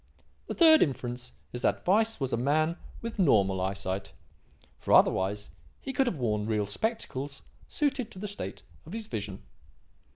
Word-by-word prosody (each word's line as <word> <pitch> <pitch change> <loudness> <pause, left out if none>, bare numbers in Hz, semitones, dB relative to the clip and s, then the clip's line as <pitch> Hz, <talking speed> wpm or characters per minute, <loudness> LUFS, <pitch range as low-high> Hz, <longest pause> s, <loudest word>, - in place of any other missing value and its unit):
The - - -4
third 320 -2 +7
inference 125 -3 -1 0.2
is 120 - -4
that - - 0
Weiss 220 +4 +3
was 135 -2 -2
a - - +4
man 155 +7 +1 0.3
with 230 -2 -5
normal 100 - +3
eyesight; 95 0 -3 0.7
for - - 0
otherwise 100 +2 +3 0.3
he 270 - -5
could 265 0 +2
have 190 - -1
worn 105 -4 -1
real 105 -2 +1
spectacles 140 - -3 0.2
suited 275 -6 -1
to - - -11
the 210 +3 -4
state 205 - -6 0.2
of 165 - -9
his 225 -1 -4
vision. 100 - -5
135 Hz, 160 wpm, -29 LUFS, -, 0.7 s, third